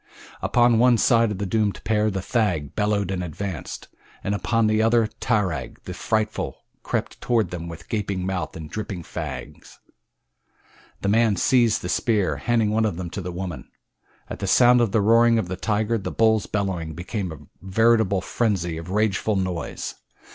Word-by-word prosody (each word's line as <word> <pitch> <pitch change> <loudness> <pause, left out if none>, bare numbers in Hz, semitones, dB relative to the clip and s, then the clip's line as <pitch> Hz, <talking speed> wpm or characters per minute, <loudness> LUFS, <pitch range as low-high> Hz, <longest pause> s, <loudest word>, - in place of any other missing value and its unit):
Upon 120 -2 +3
one 125 0 +5
side 115 0 +4
of 105 - -3
the 100 - -2
doomed 105 0 0
pair 110 -1 +2
the 95 -2 -3
thag 90 - 0
bellowed 105 -2 0
and 90 -1 -2
advanced, 90 0 -6 0.4
and 100 - -1
upon 115 +3 +1
the 110 0 +2
other 115 0 +4
tarag, 95 - -1
the - - -6
frightful, 110 -1 -2 0.2
crept - - -3
toward 115 -7 +1
them 85 -1 -5
with 85 -1 -9
gaping 100 -4 -2
mouth 95 -1 -3
and 80 -1 -7
dripping 100 -1 -5
fangs. - - -7 1.2
The 100 - 0
man 110 0 +3
seized 120 +3 +3
the - - -3
spears, 105 0 +1
handing 115 -3 +2
one 110 +1 +2
of 100 -6 -1
them 90 -2 -5
to 100 - -4
the 90 0 -5
woman. 85 -6 -6 0.6
At - - -7
the 100 - -3
sound 125 +4 +6
of 115 -4 +1
the 110 - +2
roaring 115 +2 +5
of 95 -6 -1
the 95 - -2
tiger 110 +3 0
the 100 - -4
bull's 110 -1 +2
bellowing 90 -6 -2
became 90 +1 -4
a 80 - -7 0.3
veritable 110 0 +3
frenzy 95 -7 -1
of 85 +2 -8
rageful 105 +1 +1
noise. 90 -4 -3
105 Hz, 175 wpm, -24 LUFS, 90-110 Hz, 1.2 s, sound